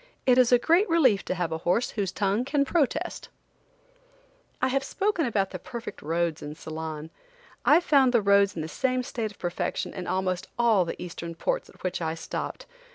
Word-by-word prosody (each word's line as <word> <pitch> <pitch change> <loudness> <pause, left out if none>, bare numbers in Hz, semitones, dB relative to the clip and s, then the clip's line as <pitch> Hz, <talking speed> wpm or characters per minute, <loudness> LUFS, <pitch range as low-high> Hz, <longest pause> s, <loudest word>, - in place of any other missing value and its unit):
It 255 -1 +5
is 250 -1 +5
a 245 - +8
great 340 - +3
relief 260 -12 +4
to - - -2
have 175 -2 -2
a 160 - -2
horse 180 +9 +1
whose 200 -4 -2
tongue 205 +3 0
can 280 +1 +1
protest. 290 -2 -1 1.3
I - - +2
have 275 +1 0
spoken 360 0 0
about 200 -4 0
the 185 - -6
perfect 235 +5 -7
roads 165 +1 -1
in 150 +1 -7
Ceylon. 160 0 -6 0.5
I 305 - +7
found 275 -7 +4
the 235 -4 +3
roads 200 -1 +4
in 160 - -3
the - - -4
same 255 +8 -1
state 230 -3 -3
of 205 - -16
perfection 175 -1 -3
in 185 -2 -6
almost 185 -1 -1
all 225 -6 +4
the 165 - -5
Eastern 170 -1 -6
ports - - -2
at - - -18
which 185 -1 -2
I 160 0 -1
stopped. 165 - -5
200 Hz, 195 wpm, -27 LUFS, 175-255 Hz, 1.3 s, a